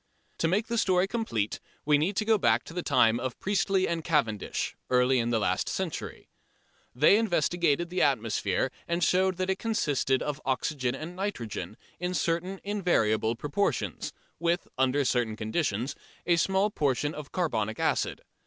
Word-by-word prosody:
To 165 - +2
make 195 +6 +1
the 235 -1 -1
story 185 -2 +3
complete 195 - -2 0.3
we 145 0 +4
need 185 +7 0
to 215 - 0
go 220 -1 +3
back - - +3
to - - -11
the 180 - -2
time 120 -7 +3
of 125 -1 -4
Priestly 195 -1 +1
and 165 -1 -2
Cavendish, 115 - 0
early 125 +1 +3
in 115 0 0
last 115 -3 0
century. - - -4 0.7
They 150 +10 +6
investigated 175 -5 +1
the 180 - 0
atmosphere 115 -2 +1 0.2
and 170 +1 0
showed 185 +1 +2
that 185 +1 0
it 190 - -2
consisted 145 - 0
of 150 0 -3
oxygen 130 -1 -1
and 160 +5 -7
nitrogen 115 - -4 0.2
in 180 +1 -2
certain 180 +4 -1
invariable 120 - +1
proportions, 130 - -1 0.3
with 170 +1 0
under 130 +2 +2
certain 120 -3 +1
conditions 110 +1 -1 0.3
a 170 -1 +3
small 190 +4 +2
proportion 145 -2 0
of 150 -2 -8
carbonic 110 - -1
acid. - - 0
150 Hz, 155 wpm, -28 LUFS, 125-185 Hz, 0.7 s, They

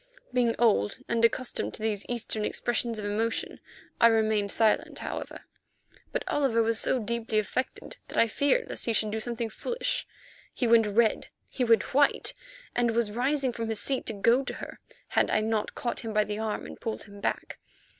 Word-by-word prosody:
Being 240 -2 +2
old 210 - +3
and 230 0 0
accustomed 240 +2 +1
to 215 - -8
these 210 -2 -1
Eastern 225 -3 -2
expressions 235 +1 -1
of 210 - -4
emotion, 220 +2 -2 0.4
I 230 - +8
remained 220 -3 +2
silent, 220 -2 +2
however; - - -5 0.7
but - - -1
Oliver 255 -6 +2
was 225 0 +1
so - - +2
deeply 230 -1 -2
affected 255 - -2
that - - -7
I 230 - +5
feared 285 - +1
lest - - -3
he 230 - +1
should 215 -1 0
do 220 - -1
something 235 0 -3
foolish. - - -3 0.5
He 250 - 0
went 230 -2 +5
red, 220 +2 +2 0.2
he 255 - -2
went 230 -1 +3
white, 285 +2 +3 0.4
and 240 -1 +2
was 230 -3 +1
rising 260 +3 0
from 230 -1 -3
his 220 -2 0
seat 265 +5 -1
to 225 - 0
go 230 +6 +3
to - - -5
her, - - -8 0.3
had - - +2
I - - +3
not 215 0 -1
caught 240 - -3
him 225 -2 -5
by 210 0 +4
the 210 0 -4
arm 220 -1 -2
and - - -10
pulled 225 - -3
him 200 0 -13
back. - - -2
230 Hz, 190 wpm, -28 LUFS, 215-240 Hz, 0.7 s, I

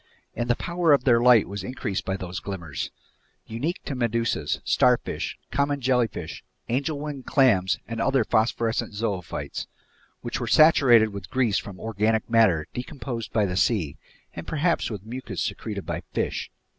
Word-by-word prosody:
And 120 0 -2
the 120 - +4
power 170 0 +2
of 140 - +3
their 120 -3 +4
light 120 -3 +6
was 100 -1 -5
increased 105 -3 -3
by 95 0 -1
those 90 +1 -5
glimmers 85 - -5 0.6
unique 135 +11 -3
to - - -3
medusas, 115 -2 0
starfish, - - +1
common 140 0 0
jellyfish, 120 - -1 0.3
angel 140 +5 0
wing 145 -2 -5
clams, 115 -10 +3
and 115 0 -4
other 135 0 +3
phosphorescent 115 0 0
zoophytes, 100 -6 -3 0.5
which - - -3
were - - -3
saturated 130 -8 +6
with 100 -3 -8
grease 125 -6 +1
from 95 -2 -9
organic 110 0 0
matter 110 -10 +4
decomposed 125 -3 -5
by 110 -2 +2
the 90 -2 -2
sea, 90 -8 +1 0.4
and 85 - -8
perhaps 165 +2 0
with 105 -3 -7
mucus 125 +4 -6
secreted 105 -4 -4
by 85 0 -3
fish. - - -2
115 Hz, 155 wpm, -25 LUFS, 100-130 Hz, 0.6 s, light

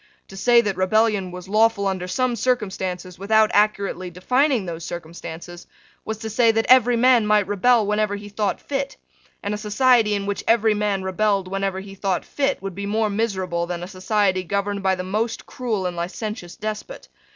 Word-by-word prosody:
To 195 - -11
say 235 +4 +5
that 205 -5 -2
rebellion 205 0 +2
was 180 0 -9
lawful 215 0 +2
under 190 -2 -2
some 250 +6 0
circumstances, 190 -6 -2
without 215 +2 +3
accurately 200 -3 +1
defining 250 - +1
those 170 -1 -6
circumstances, 170 +1 -8 0.4
was 220 0 -4
to 220 0 -6
say 230 +1 +4
that 225 0 +1
every 245 -1 +6
man 245 -2 +4
might 210 -1 +3
rebel 210 +4 +3
whenever 210 0 0
he 205 0 -8
thought 205 -1 -2
fit; 275 -1 -4 0.5
and 205 - -2
a 210 - -4
society 220 0 +3
in 200 -1 -3
which 200 0 -3
every 225 -1 +4
man 205 -2 -1
rebelled 195 0 0
whenever 195 0 -2
he 195 0 -10
thought 195 -1 -2
fit 275 -6 -1
would 195 -1 -4
be 200 +2 -5
more 215 +1 0
miserable 190 -5 -1
than 175 0 -4
a - - -5
society 190 0 0
governed 200 +2 -2
by 190 0 +2
the 185 - -5
most 215 +5 -2
cruel 225 -7 -3
and 180 -1 -2
licentious 180 +1 -5
despot. 215 - -6
205 Hz, 185 wpm, -22 LUFS, 185-220 Hz, 0.5 s, every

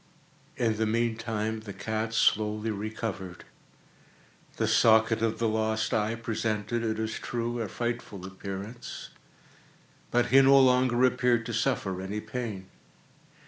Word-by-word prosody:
In 115 -3 +1
the 110 0 +1
meantime 110 -1 -1
the 105 -2 -8
cat 110 +3 -3
slowly 110 0 +2
recovered. 100 -3 -5 1.1
The - - +1
socket 110 0 +4
of 115 -1 0
the 115 - +1
lost 110 0 0
eye 110 +1 +1
presented, 115 0 -2
it 110 -1 -1
is 110 0 -3
true, 120 0 -3
a 110 - -2
frightful 115 -3 -4
appearance, 100 +4 -7 1.0
but 120 0 +1
he 135 +1 +7
no 135 0 +7
longer 125 -1 +4
appeared 125 -2 +2
to 115 - -4
suffer 110 -6 -1
any 100 +3 -4
pain. 110 -3 -5
110 Hz, 130 wpm, -28 LUFS, 105-120 Hz, 1.1 s, he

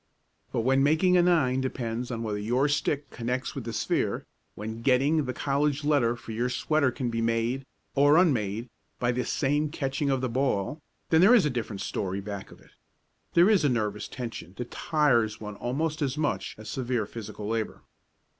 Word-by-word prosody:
But - - 0
when 135 +3 +3
making 160 +6 +4
a 180 - +6
nine 150 -8 +3
depends 120 -2 -3
on 115 -2 -3
whether 105 -2 -2
your 120 +7 +1
stick 145 -1 -1
connects 125 +2 -3
with 135 -6 -6
the 115 - -3
sphere 115 +1 -1 0.3
when 110 +2 -6
getting 140 +5 +3
the 125 - -2
college 145 +3 0
letter 140 -6 +2
for 120 -1 -10
your 120 +3 -1
sweater 140 +2 +1
can 125 -1 -3
be 115 0 -1
made, 115 +4 0 0.3
or 145 +2 +5
unmade, 115 - +1 0.3
by 120 0 +1
this 125 -1 -2
same 145 +2 +1
catching 140 -1 -2
of 135 -1 +2
the 130 - -1
ball, 130 +2 -1 0.3
then 160 0 +6
there 215 +7 +8
is 210 - +5
a 150 - +1
different 110 -5 -4
story 95 0 -2
back 100 0 -6
of - - -15
it. - - -21 0.6
There 170 +2 +7
is 210 -6 +4
a 145 - +4
nervous 105 -4 -1
tension 115 -8 -7
that 125 -1 -6
tires 120 -9 +2
one 105 -1 -7
almost 150 +7 -2
as 140 0 -1
much 150 -1 -1
as 110 0 -10
severe 120 -2 -1
physical 105 -1 -7
labor. 110 -1 -3
125 Hz, 190 wpm, -27 LUFS, 115-145 Hz, 0.6 s, there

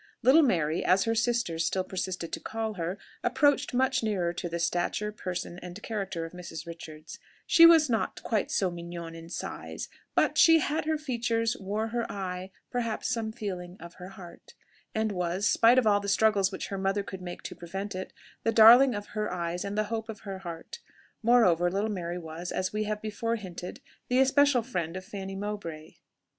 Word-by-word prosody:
Little 265 +7 +7
Mary, 165 - +1
as 185 +2 +4
her 225 - +1
sisters 235 -8 0
still 185 +3 0
persisted 185 -2 -4
to - - -2
call 225 -1 -3
her, 175 0 -3 0.3
approached 270 +3 +2
much 260 +1 +2
nearer 190 -6 0
to 175 0 -4
the 170 - -3
stature, 175 +5 -1
person, 180 -3 -5
and 180 +2 -8
character 195 -6 -3
of 165 - -8
Mrs. 170 -2 -8
Richards; 160 -2 -9 0.3
she 335 0 +8
was 325 -2 +6
not 225 -3 -1
quite 220 -3 0
so 190 -2 +1
mignonne 170 -1 -7
in 165 0 -10
size, - - -6 0.3
but - - +2
she 325 0 +8
"Had 305 0 -1
her 315 0 +1
features, 235 -5 -1
wore 210 +3 -2
her 235 0 -2
eye, 185 -1 -4 0.2
Perhaps 230 -3 -2
some 225 -2 -2
feeling 185 -4 -6
of 170 +1 -10
her 180 0 -10
heart," 180 -3 -13 0.4
and 220 0 +1
was, 180 +1 -1
spite 235 +2 +5
of 255 - +4
all 205 -1 +4
the 200 0 -4
struggles 205 -2 +3
which 190 - -5
her 195 - -3
mother 195 +1 0
could 190 -1 -8
make 175 -1 -7
to - - -6
prevent 195 +4 -5
it, 185 0 -5 0.3
the 225 - +2
darling 235 +3 +8
of 205 0 -6
her 215 0 -2
eyes 175 0 -3
and 200 +1 -4
the 215 - +3
hope 225 0 -3
of 215 -2 -7
her 195 -3 -6
heart. 170 - -8 0.4
Moreover, 190 -8 +4
little 200 +4 -1
Mary 175 -3 -3
was, 165 +1 -6
as 185 +1 -2
we 215 0 -1
have 210 0 -3
before 230 +2 -2
hinted, 180 -4 -7 0.3
the 250 - +1
especial 270 -1 +4
friend 180 -7 -3
of 185 - -8
Fanny 195 -1 -6
Mowbray. 195 -6 -6
200 Hz, 195 wpm, -28 LUFS, 175-225 Hz, 0.4 s, she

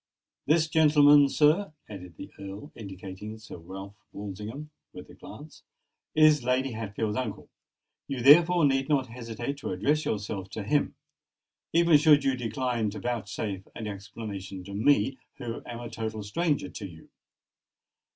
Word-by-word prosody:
This 160 +2 +4
gentleman, 150 -2 +6
sir," 155 +6 +3
added 90 -5 -10
the - - -9
Earl, 100 +8 -8
indicating 100 +1 -8
Sir 110 -5 -11
Ralph 95 +4 -9 0.2
Walsingham 105 +9 -7 0.2
with - - -11
a - - -14
glance, - - -12 0.5
"is 155 -3 +5
Lady 130 +2 +1
Hatfield's 110 -1 -3
uncle: 125 -6 -5 0.6
you 135 -2 -4
therefore 170 +4 +7
need 135 0 +1
not 140 -3 +2
hesitate 120 +3 -5
to 140 - -5
address 145 +12 +1
yourself 100 -2 -3
to 110 - -5
him—even 150 +5 0
should 150 -2 +5
you 135 -1 +2
decline 120 -1 -1
to 105 - -7
vouchsafe 105 -4 -4
an 110 - -6
explanation 100 -2 -7
to 100 +2 -9
me, 130 +3 +2 0.2
who 120 -3 -5
am 120 -1 -6
a 120 - -6
total 110 -2 -5
stranger 145 +6 -1
to 100 - -7
you." 80 -2 -14
115 Hz, 140 wpm, -28 LUFS, 100-145 Hz, 0.6 s, therefore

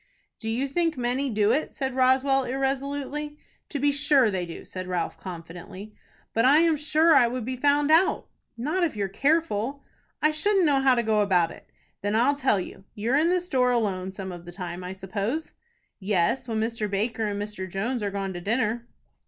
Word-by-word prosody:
"Do 220 - -4
you 250 +5 -1
think 330 +2 0
many 250 +3 0
do 210 -2 +2
it?" 295 +6 -1
said 265 -2 -2
Roswell, 265 +1 +3
irresolutely. 275 +3 -3 0.3
"To 290 - -3
be 285 +1 +2
sure 280 -5 +3
they 180 -2 -2
do," 165 - -9
said 185 -1 -7
Ralph, 180 -2 -2
confidently. 180 +3 -9 0.4
"But 230 - +2
I 275 +4 +6
am 330 -2 +3
sure 310 +2 +3
it 240 -3 +5
would 250 -2 -4
be 255 +1 -3
found 290 +3 +2
out." 335 +4 +3 0.3
"Not 310 +10 -1
if 315 -8 0
you're 200 -2 -1
careful." 280 - 0 0.4
"I 305 - +3
shouldn't 380 +4 +2
know 285 -3 +3
how 265 -1 +5
to 235 - +1
go 215 -1 +2
about 180 -5 +2
it." - - -14 0.3
"Then 205 +1 -1
I'll 245 +6 +4
tell 265 -8 +1
you. 190 +1 -8
You're 225 +4 -1
in 315 +4 +3
the 365 0 +3
store 260 -8 +1
alone 195 -6 0
some 190 -1 -6
of 175 -1 -9
the 175 - -9
time, 175 -1 -6
I 180 +1 -5
suppose." 200 - -3 0.5
"Yes, 205 +6 0
when 225 -2 -1
Mr. 225 -1 -2
Baker 220 +2 -1
and 205 -1 -3
Mr. 205 -2 -5
Jones 225 +7 -2
are 205 - -1
gone 195 -1 -3
to 175 - -6
dinner." 230 +3 -1
240 Hz, 200 wpm, -26 LUFS, 200-280 Hz, 0.5 s, I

